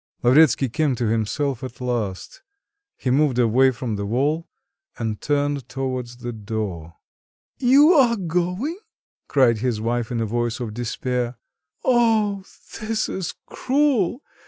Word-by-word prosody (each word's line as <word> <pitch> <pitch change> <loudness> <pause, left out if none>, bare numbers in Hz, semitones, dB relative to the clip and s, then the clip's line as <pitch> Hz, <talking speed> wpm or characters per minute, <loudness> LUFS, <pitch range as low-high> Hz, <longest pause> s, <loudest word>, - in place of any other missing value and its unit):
Lavretsky 135 +1 +5
came 140 +2 0
to 120 - -2
himself 115 +5 -1
at 125 -2 -7
last; 120 - -3 0.6
he 125 - -1
moved 140 -1 +2
away 125 +2 +4
from 115 -4 -3
the 100 - -3
wall 145 +9 0 0.5
and 110 -3 -3
turned 145 -3 -1
towards 130 -2 -4
the 120 -1 -6
door. 100 -7 -5 0.6
"You 275 +6 +6
are 255 -7 +5
going?" 180 - -2 0.5
cried 120 -5 +3
his 120 -2 -1
wife 115 +1 -1
in 120 - -1
a 115 - 0
voice 120 +2 -2
of 115 -4 -4
despair. 120 +1 -3 0.5
"Oh, 220 -5 +2 0.4
this 220 0 -1
is 175 -2 -4
cruel! 265 -4 +1
130 Hz, 135 wpm, -22 LUFS, 115-175 Hz, 0.6 s, You